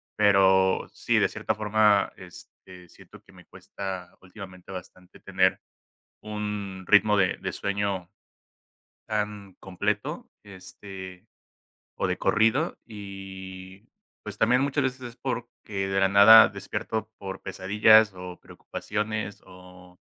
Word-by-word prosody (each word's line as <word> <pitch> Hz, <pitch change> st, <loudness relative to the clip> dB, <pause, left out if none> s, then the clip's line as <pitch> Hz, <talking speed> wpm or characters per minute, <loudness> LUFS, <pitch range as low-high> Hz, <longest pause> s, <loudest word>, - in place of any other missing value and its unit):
pero 95 Hz, -2 st, +3 dB
sí, -, -, +1 dB
de -, -, +2 dB
cierta -, -, -3 dB
forma, 105 Hz, -1 st, +2 dB
este, 90 Hz, -1 st, -14 dB
siento -, -, -17 dB
que -, -, -21 dB
me -, -, -17 dB
cuesta 95 Hz, -3 st, -8 dB
últimamente 95 Hz, -1 st, -12 dB
bastante 90 Hz, 0 st, -11 dB
tener -, -, +1 dB, 0.6 s
un 105 Hz, -3 st, -5 dB
ritmo 105 Hz, 0 st, +5 dB
de 95 Hz, -2 st, +2 dB
de -, -, -4 dB
sueño, 100 Hz, -3 st, -3 dB, 1.0 s
am, 105 Hz, -3 st, -4 dB
completo, 105 Hz, -, -3 dB
este, 95 Hz, -2 st, -11 dB, 0.7 s
o -, -, -1 dB
de -, -, -1 dB
corrido 115 Hz, +10 st, +1 dB
y 95 Hz, -1 st, -10 dB, 0.3 s
pues 105 Hz, 0 st, -8 dB
también 125 Hz, +3 st, +3 dB
muchas 140 Hz, +1 st, 0 dB
veces 130 Hz, 0 st, -3 dB
es 120 Hz, 0 st, -9 dB
porque 120 Hz, -6 st, -5 dB
de 95 Hz, 0 st, 0 dB
la 95 Hz, -, +4 dB
nada 100 Hz, +3 st, +9 dB
despierto 110 Hz, +2 st, -5 dB
por 95 Hz, -1 st, -7 dB
pesadillas 105 Hz, +2 st, +4 dB
o 90 Hz, -1 st, -9 dB
preocupaciones 105 Hz, -1 st, -5 dB
o, 90 Hz, -1 st, -16 dB
100 Hz, 120 wpm, -26 LUFS, 95-110 Hz, 1.0 s, nada